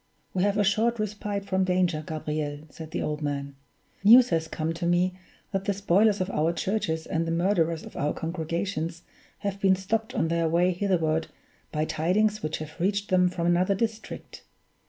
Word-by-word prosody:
"We 185 - 0
have 200 +1 +2
a 205 - +4
short 220 +4 +2
respite 205 -1 -3
from 190 -1 +1
danger, 180 -4 +1
Gabriel," 150 -1 -3
said 160 -1 -9
the - - -3
old 150 0 -3
man. 140 -1 -3 0.5
"News 240 +4 +8
has 165 -2 0
come 160 0 -2
to 170 +1 -3
me 175 +1 +2 0.4
that 195 0 -2
the 200 -1 0
spoilers 200 +2 +3
of 185 +1 -1
our 160 0 +1
churches 165 -4 -1
and 165 +1 -1
the - - -1
murderers 170 -2 +1
of - - -11
our 145 - 0
congregations 165 0 -3 0.4
have 200 -1 -2
been 190 -1 +5
stopped 220 +6 -2
on 165 -8 +1
their 165 -1 +1
way 175 +3 +3
hitherward 165 -4 0 0.4
by 155 0 0
tidings 210 +8 +1
which 155 - -2
have 155 +3 -9
reached 200 +3 0
them 180 -1 +4
from 175 -1 -3
another 180 +3 +3
district. 225 +1 -4
180 Hz, 180 wpm, -27 LUFS, 160-200 Hz, 0.5 s, News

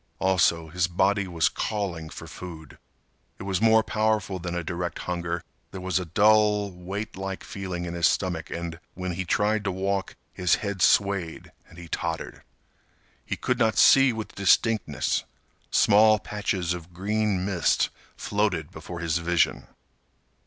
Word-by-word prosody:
Also, 85 -3 +2
his 90 +1 0
body 95 +3 +1
was 85 -3 +2
calling 95 -7 -3
for - - -9
food. 80 -4 -10 0.6
It - - -8
was 95 0 -1
more 110 0 +5
powerful 110 -3 0
than 85 0 -4
a 85 - -2
direct 85 +1 -4
hunger. 85 -1 -3 0.3
There 95 - -8
was 95 0 0
a 90 - -4
dull, 105 +2 +3
weight 95 +4 -6
like 95 0 -5
feeling 95 -5 -5
in 85 - -5
his 85 -2 +3
stomach, 90 -4 -1
and, 85 -1 -5 0.2
when 90 0 -3
he 90 +2 -3
tried 105 +3 +1
to 95 - 0
walk, 95 +1 -2 0.2
his 90 -1 +2
head 100 -3 -4
swayed 100 -6 +2 0.2
and 80 - -16
he 85 -1 -9
tottered. 80 0 -4 0.8
He - - -3
could 125 - -1
not 110 -2 +2
see 135 -1 +7
with 110 -2 -6
distinctness. 100 -4 +2 0.5
Small 110 +1 +5
patches 100 -4 -2
of 85 0 -9
green 100 0 0
mist 95 -4 +1 0.3
floated 100 -7 -1
before 85 -1 -8
his 85 0 0
vision. 85 0 +1
95 Hz, 150 wpm, -26 LUFS, 85-105 Hz, 0.8 s, see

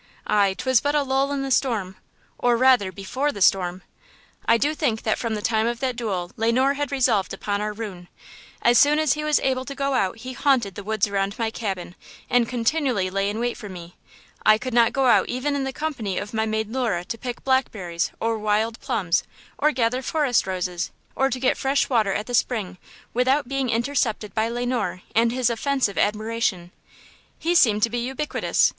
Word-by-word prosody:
"Aye! 200 -2 +2
'twas 255 -1 +2
but 290 +1 0
a 295 - +3
lull 270 +1 0
in 280 -1 -1
the 270 - -3
storm," 215 -8 0 0.4
or, 240 -1 +3
rather, 250 -6 +4
before 255 +10 -2
the 205 - -8
storm! 185 -1 +2 0.6
I 230 - +5
do 290 +6 +1
think 245 -8 -1
that 215 - 0
from 230 -2 -2
the 210 - -5
time 220 0 +1
of 235 0 -2
that 255 -2 -1
duel 195 -7 -3
Le 225 +1 +2
Noir 260 +3 +3
had 290 0 -3
resolved 245 -8 +1
upon 205 0 -2
our 210 0 -2
ruin. 205 -5 -7 0.6
As 240 0 +5
soon 295 +1 +5
as 310 -5 +3
he 300 - -4
was 305 -1 +3
able 260 -1 0
to 275 +1 -7
go 275 0 -1
out 195 -5 0
he 255 +3 -7
haunted 250 -8 +1
the 200 - -8
woods 215 0 +1
around 200 0 -2
my 225 -1 -1
cabin 190 -6 -4 0.4
and 245 -2 +3
continually 245 -5 0
lay 195 +1 0
in 210 +2 -3
wait 240 0 -1
for 210 - -8
me. 175 -2 -10 0.5
I 215 0 +6
could 255 +2 -5
not 235 -1 +4
go 270 -1 +1
out 250 - +4
even 280 +4 -1
in 275 -1 -1
the 265 - -2
company 255 -11 -3
of 205 - -4
my 220 0 0
maid 220 0 -1
Lura 230 -9 -1
to 230 - -5
pick 245 0 -6
blackberries 200 -10 0
or 225 0 -1
wild 215 +2 0
plums 180 -7 0 0.4
or 300 +1 +3
gather 250 -1 0
forest 265 -6 +1
roses, 180 -2 -2 0.3
or 270 0 +2
to 255 - -3
get 255 - +1
fresh 275 +1 +1
water 220 -5 +3
at 210 +2 -2
the 245 - -7
spring, 210 -7 0 0.3
without 260 +3 +2
being 270 -1 -1
intercepted 230 -3 -1
by 220 +1 0
Le 240 +1 -2
Noir 245 -7 -2
and 230 +1 +3
his 245 -1 +1
offensive 255 -2 0
admiration. 215 -4 -1 0.7
He 340 +2 0
seemed 215 -11 +4
to 230 - +2
be 240 - -1
ubiquitous! 265 +5 +1
230 Hz, 205 wpm, -23 LUFS, 205-265 Hz, 0.7 s, I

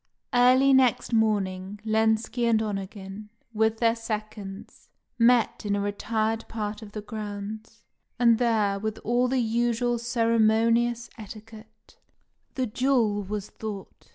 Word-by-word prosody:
Early 255 +2 +5
next 255 -2 +3
morning, 205 -3 0
Lenski 220 +2 +1
and 225 -1 +3
Onegin, 200 0 -5 0.2
with 220 0 +1
their 230 0 +2
seconds, 215 -3 -7 0.3
met 235 0 +3
in 205 -1 0
a - - -1
retired 220 +2 -1
part 210 -1 -4
of 210 -1 -11
the 210 - -6
grounds, 215 0 -7 0.3
and 235 -2 +4
there, 215 -5 +1
with 220 +1 -3
all 245 +2 +2
the 260 +1 0
usual 240 0 0
ceremonious 230 0 +2
etiquette, 220 +1 -13 0.6
the 260 - 0
duel 230 -3 +1
was 205 +1 -5
fought. 210 -3 -8
220 Hz, 125 wpm, -26 LUFS, 210-235 Hz, 0.6 s, Early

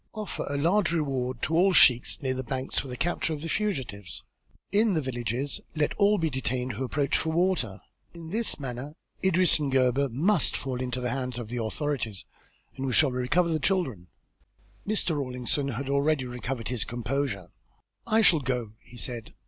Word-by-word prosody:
Offer 215 -1 -4
a 145 - -1
large 170 +5 +3
reward 130 -6 -1
to 160 - 0
the 185 +3 +4
sheiks 125 +1 +5
near 130 -1 +1
the 130 - -3
banks 130 +1 -2
for - - -4
the 125 -1 -6
capture 165 +1 0
of 150 - -5
the - - -3
fugitives. 130 - -2 0.5
In 210 0 +3
the 160 - +2
villages 125 +1 -2
let 150 -1 +1
all 205 0 +4
be 160 -3 0
detained 130 0 -1
who 120 +4 -4
approach 140 +2 0
for 160 - +1
water. 160 - +1 0.3
In 165 -1 -10
this 225 -3 -1
manner 135 +2 -5 0.3
Idris 185 -3 +4
and 145 -2 -1
Gebhr 130 +1 +3
must 165 - +2
fall 130 -2 -3
into 125 0 -2
the 125 -1 -1
hands 125 -1 -3
of 120 -3 -5
the 120 -1 -2
authorities 115 - -2 0.5
and 135 0 -3
we 130 - -1
shall 145 0 +5
recover 125 +8 +1
the 160 -1 +1
children." 135 - 0 0.8
Mr. 205 -6 +1
Rawlinson 130 0 -1
had 135 +1 -3
already 140 0 +2
recovered 125 -1 -4
his 125 -3 0
composure. 120 -5 -3 0.6
"I 220 +1 +4
shall 170 -6 +6
go," 125 -5 -2
he 120 - -15
said. 120 -3 -5
135 Hz, 180 wpm, -28 LUFS, 125-160 Hz, 0.8 s, shall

